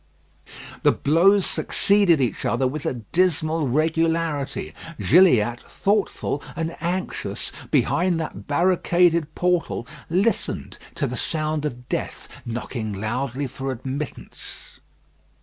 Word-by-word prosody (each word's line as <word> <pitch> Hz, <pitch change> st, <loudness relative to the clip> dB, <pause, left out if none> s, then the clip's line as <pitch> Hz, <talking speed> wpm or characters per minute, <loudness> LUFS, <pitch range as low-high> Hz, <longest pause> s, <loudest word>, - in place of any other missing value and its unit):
The -, -, +5 dB
blows 185 Hz, +7 st, +4 dB
succeeded 200 Hz, -6 st, +3 dB
each 125 Hz, -3 st, -1 dB
other 130 Hz, +3 st, +1 dB
with 140 Hz, +3 st, -4 dB
a -, -, 0 dB
dismal 155 Hz, -, +1 dB
regularity. 155 Hz, -, 0 dB, 0.3 s
Gilliatt, 125 Hz, -, +4 dB
thoughtful 200 Hz, -7 st, 0 dB
and 165 Hz, 0 st, -3 dB
anxious, 180 Hz, +2 st, -3 dB, 0.2 s
behind 175 Hz, -1 st, +2 dB
that 160 Hz, -, -6 dB
barricaded 170 Hz, -1 st, +2 dB
portal, 180 Hz, -8 st, 0 dB, 0.2 s
listened 195 Hz, +7 st, 0 dB, 0.2 s
to -, -, -1 dB
the -, -, -3 dB
sound 155 Hz, -1 st, -1 dB
of 125 Hz, -3 st, -5 dB
death -, -, -4 dB, 0.2 s
knocking 115 Hz, -2 st, -4 dB
loudly 125 Hz, +7 st, -2 dB
for 135 Hz, +1 st, -4 dB
admittance. 130 Hz, +4 st, -7 dB
155 Hz, 105 wpm, -23 LUFS, 130-175 Hz, 0.3 s, The